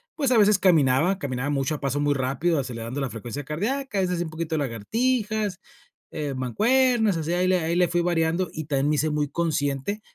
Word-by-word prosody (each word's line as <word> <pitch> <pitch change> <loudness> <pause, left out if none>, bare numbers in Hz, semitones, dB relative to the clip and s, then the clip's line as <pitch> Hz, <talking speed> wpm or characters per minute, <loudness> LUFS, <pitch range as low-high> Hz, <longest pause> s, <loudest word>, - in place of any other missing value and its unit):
pues 280 -5 0
a 240 - +4
veces 205 -1 +5
caminaba. 165 +1 +3
Caminaba 135 0 -3
mucho, 140 +2 0
a - - -7
paso 140 +1 -1
muy 145 0 +2
rápido, 140 +5 0
acelerando 125 +1 -4
la 135 - -2
frecuencia 120 +6 -6
cardíaca. 215 - -2
A - - +3
veces 180 -2 -1
un 165 - -3
poquito 160 0 -3
lagartijas, 210 - -1 0.5
eh, 150 -3 -3
mancuernas. 220 - +2
Así 165 +2 -2
ahí 180 +1 +1
le 185 -1 +3
ahí 165 +2 -1
le 180 -1 +3
fui 175 0 +1
variando. 170 +1 0
Y 155 -1 -5
también 140 -1 0
me 150 - +2
hice 155 +1 +1
muy 150 -1 0
consciente 155 +4 -1
160 Hz, 200 wpm, -25 LUFS, 140-190 Hz, 0.5 s, veces